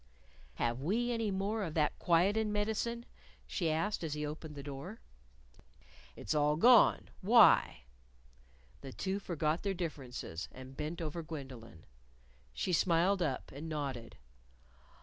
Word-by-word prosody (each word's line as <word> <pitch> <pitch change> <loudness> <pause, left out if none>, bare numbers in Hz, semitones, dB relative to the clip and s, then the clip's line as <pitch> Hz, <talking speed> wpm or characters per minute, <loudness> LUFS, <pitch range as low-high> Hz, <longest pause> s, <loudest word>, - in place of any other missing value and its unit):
"Have 120 +2 -1
we 230 - 0
any 230 -2 -1
more 200 +3 -1
of 165 -6 -4
that 150 -2 +1
quietin' 200 +6 +2
medicine?" 220 +3 -1 0.4
she 170 -5 -1
asked 165 +6 -1
as 155 -2 -2
he 150 0 -3
opened 150 0 -7
the 140 - -7
door. 145 +10 -7 1.2
"It's - - -3
all 150 0 +3
gone. 240 +8 +5
Why?" 205 - +5 1.0
The 135 -2 -8
two 195 +1 -2
forgot 165 -4 -1
their 195 -1 -1
differences, 130 - -5
and 130 +1 -11
bent 155 +4 -4
over 160 +2 -4
Gwendolyn. 130 - -9 0.7
She 65 - -2
smiled 180 +3 +3
up, 145 -6 -2
and 150 +4 -7
nodded. 135 -7 -4
160 Hz, 130 wpm, -33 LUFS, 145-200 Hz, 1.2 s, gone